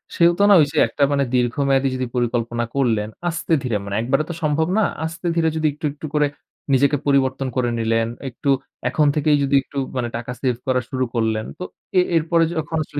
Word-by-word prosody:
সেহেতু 170 +2 +3
না - - +8
ঐ - - +7
যে - - -6
একটা 140 +5 -1
মানে 140 -1 +2
দীর্ঘমেয়াদী 135 +2 +2
যদি 130 0 -2
পরিকল্পনা 120 -1 -1
করলেন, 110 -6 +1 0.2
আস্তে 165 0 -2
ধীরে, 120 -4 -1
মানে 100 - -4
একবারে 135 +6 +1
তো - - -3
সম্ভব 155 +1 +1
না, 220 - +4 0.2
আস্তে 165 +2 -5
ধীরে 165 -1 +2
যদি 160 -1 +1
একটু, 150 +1 -7
একটু 150 - -9
করে 150 -1 +3 0.5
নিজেকে 140 +2 +3
পরিবর্তন 135 -1 +1
করে 125 -2 +1
নিলেন। 115 0 +1 0.2
একটু 130 +3 -4 0.4
এখন 150 -1 +2
থেকেই 150 -1 +3
যদি 140 0 +1
একটু 140 - -11 0.2
মানে 120 -1 -1
টাকা 120 +1 -6
save 125 -3 0
করা 130 -1 +2
শুরু 130 -1 -1
করলেন। 110 -1 0
তো - - -4 0.4
এ - - +6 0.2
এরপরে 165 +1 +2
যখন 160 +1 -3
আসলে 145 -1 -6
135 Hz, 200 wpm, -21 LUFS, 120-155 Hz, 0.5 s, না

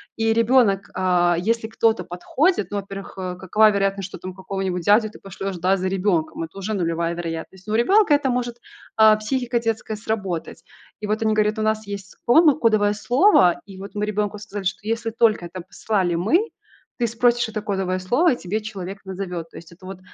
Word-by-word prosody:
И 225 0 +1
ребенок, 230 -4 +3
а, 180 -2 +2
если 225 +4 0
кто-то 225 0 +1
подходит, 255 - 0
ну, 205 - -2
во-первых, 195 0 -7
э, 185 -1 -4
какова 210 +4 +4
вероятность, 195 -1 -1
что - - -9
ты - - -30
там 185 - -6
какого-нибудь 190 -2 -3
дядю 215 +4 +4
ты - - -13
пошлешь, 195 0 -6
да, 185 +3 +2
за 185 0 -2
ребенком? 180 -5 0
Это 165 +4 -9
уже 215 +3 -3
нулевая 170 -2 -1
вероятность. 170 +3 -6
У 215 - -2
ребенка 380 - +4
это 285 -2 0
может, 240 -1 -2 0.4
а, 220 -1 +7
психика 240 +2 -1
детская 225 -1 -2
сработать. 195 -6 -4 0.4
И 210 - -5
вот 215 +1 -1
они 220 - +2
говорят, 215 0 +1
у - - 0
нас 215 0 0
есть 200 -2 -7
дома 305 +5 +6
кодовое 215 -5 +3
слово, 240 - +4
и 195 -2 -11
вот 200 +2 -9
мы 210 0 -1
ребенку 210 0 -2
сказали, 205 -2 -7
что 195 +3 -3
если 230 0 -1
только 220 -5 +2
это 180 +1 -7
послали 190 0 -1
мы, 315 - +2 0.5
ты 235 - +2
спросишь 240 +1 +2
это 215 -1 -4
кодовое 190 -2 -2
слово, 255 - +2
и - - -4
тебе 195 +4 -3
человек 195 -2 -7
назовет. 180 -3 -5
То - - -18
есть 165 - -12
это 180 +2 -16
вот 190 -1 -8
205 Hz, 200 wpm, -22 LUFS, 185-225 Hz, 0.5 s, а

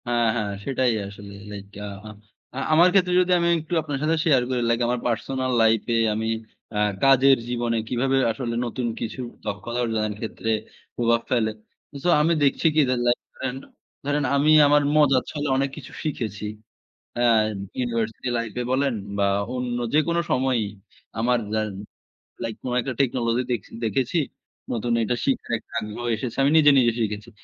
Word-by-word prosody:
হ্যাঁ, 120 -1 +2
হ্যাঁ। 105 -3 -1
সেটাই 130 -3 +1
আসলে। 100 0 -10 0.2
লাইক, 100 -1 -7 0.2
আ - - -5 0.7
আ - - -3
আমার 170 +3 +7
ক্ষেত্রে 185 -2 +3
যদি 180 0 0
আমি 170 - +1
একটু 160 +2 -7
আপনার 145 -2 -4
সাথে 160 +2 +2
শেয়ার 140 -6 +4
করি। 125 -1 0
লাইক, 115 0 +2
আমার 125 0 0
পার্সোনাল 130 +3 -1
লাইফে 115 +1 +2 0.2
আমি 110 +1 -2 0.4
অ্যা 105 - -2 0.2
কাজের 135 0 +6
জীবনে, 120 -1 0
কিভাবে 135 +2 +1
আসলে 115 -1 -4
নতুন 120 +1 -3
কিছু 115 +3 -4 0.2
দক্ষতা 120 +4 -4
অর্জনের 110 -2 -1
ক্ষেত্রে, 115 0 -3 0.4
প্রভাব 115 -1 +2
ফেলে। 115 -3 +2 0.5
সো 180 - +2
আমি 165 +3 +3
দেখছি 140 +4 +3
কি? 155 - +6
যে, 130 - +2
লাইক 120 - +3
ধরেন, 130 -1 -4 0.5
ধরেন 145 +1 0
আমি 145 +2 +4 0.2
আমার 145 +1 +5
মজার 135 -4 +4
ছলে 150 -1 -3
অনেক 135 +1 +1
কিছু - - -10
শিখেছি। 110 -9 -3 0.7
অ্যা 120 0 +2 0.5
ইউনিভার্সিটি 115 -1 -2
লাইফে 115 +1 -3
বলেন 135 0 +1 0.2
বা 100 - +2 0.3
অন্য 125 -1 -2 0.2
যেকোনো 170 +3 +2
সময়ই। 125 -4 +1 0.5
আমার 125 +2 +2 0.2
যা 110 - +2
অ্যা 100 0 -11 0.4
লাইক 115 -1 -3
কোন 125 - -3
একটা 130 +2 -4
টেকনোলজি 120 -2 0
দেখছি 115 -5 -3
দেখেছি। 125 - 0 0.5
নতুন 120 +1 -1
একটা 120 +2 0
শিখার 130 -3 0 0.2
আগ্রহ 110 +2 -6
এসেছে। 115 +2 -5
আমি 140 - +3
নিজে, 145 -2 +7
নিজে 120 -2 +4
শিখেছি। 105 0 -3
120 Hz, 160 wpm, -24 LUFS, 115-135 Hz, 0.7 s, আমার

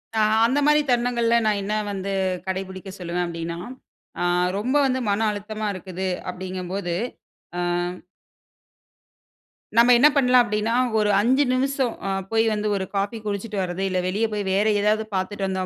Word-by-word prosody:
ஆ. - - +2 0.3
அந்த 260 +5 +2
மாரி 300 0 +5
தருணங்கள்ல, 240 -1 +2
நான் 210 -1 +2
என்ன 210 +2 -2 0.2
வந்து 195 0 -4 0.4
கடைபிடிக்க 190 0 -5
சொல்லுவேன் 175 0 -2
அப்படின்னா, 170 0 -5 0.6
ஆ - - +1 0.3
ரொம்ப 250 +7 -1
வந்து 260 -1 +1
மன 205 +2 +1
அழுத்தமா 215 +1 -5
இருக்குது 185 0 -5 0.2
அப்படிங்கும் 185 0 -6
போது. 185 -3 -2 0.7
ஆ. - - 0 2.1
நம்ம 235 +2 +7
என்ன 270 +5 +7
பண்ணலாம்? 250 -2 +5
அப்படின்னா 210 0 -1 0.2
ஒரு 210 -1 +2
5 260 +6 +3
நிமிசம் 265 -1 0
அ - - -1 0.2
போய் 225 0 +3
வந்து 210 0 -1
ஒரு 190 -1 -2
காஃபி 200 +3 -1
குடிச்சிட்டு 205 +1 -3
வர்றது. 180 0 -3
இல்ல 185 -1 0
வெளிய 205 +5 0
போய் 205 - -1
வேற 200 +2 +2 0.2
ஏதாவது 215 +1 +2
பாத்துட்டு 195 +1 -2
வந்தோம் 190 -1 -2
205 Hz, 155 wpm, -23 LUFS, 190-235 Hz, 2.1 s, நம்ம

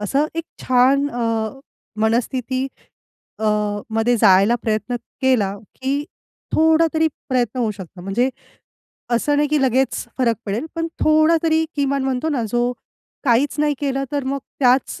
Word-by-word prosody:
असं 270 +9 +1
एक 330 - -3 0.2
छान 260 +3 +3
अ, 230 -3 -1 0.5
मनस्थिती 250 +3 0 0.7
अ, 220 - -3 0.5
मध्ये 225 +2 +2
जायला 200 +1 +5
प्रयत्न 220 +2 -1 0.3
केला 215 -7 +2 0.2
की 275 +2 -1 0.5
थोडा 320 +1 +4
तरी 320 0 +3 0.2
प्रयत्न 255 -1 0
होऊ 225 -3 +1
शकतो. 190 -2 -11
म्हणजे 225 +8 0 0.8
असं 265 +5 +1
नाही, 295 0 +2
की 300 0 +2
लगेच 260 +1 +1
फरक 235 -3 +2
पडेल 210 +9 -2
पण 330 0 -1
थोडा 310 +1 +4
तरी 320 -1 +2
किमान 280 -1 0
म्हणतो 265 +3 -1
ना 270 -5 0
जो 240 0 +1 0.5
काहीच 260 +2 +3
नाही 300 -1 +2
केलं 275 -1 -1
तर 285 -2 -1
मग 275 +1 -1 0.2
त्याच 255 0 +2
260 Hz, 145 wpm, -20 LUFS, 230-285 Hz, 0.8 s, जायला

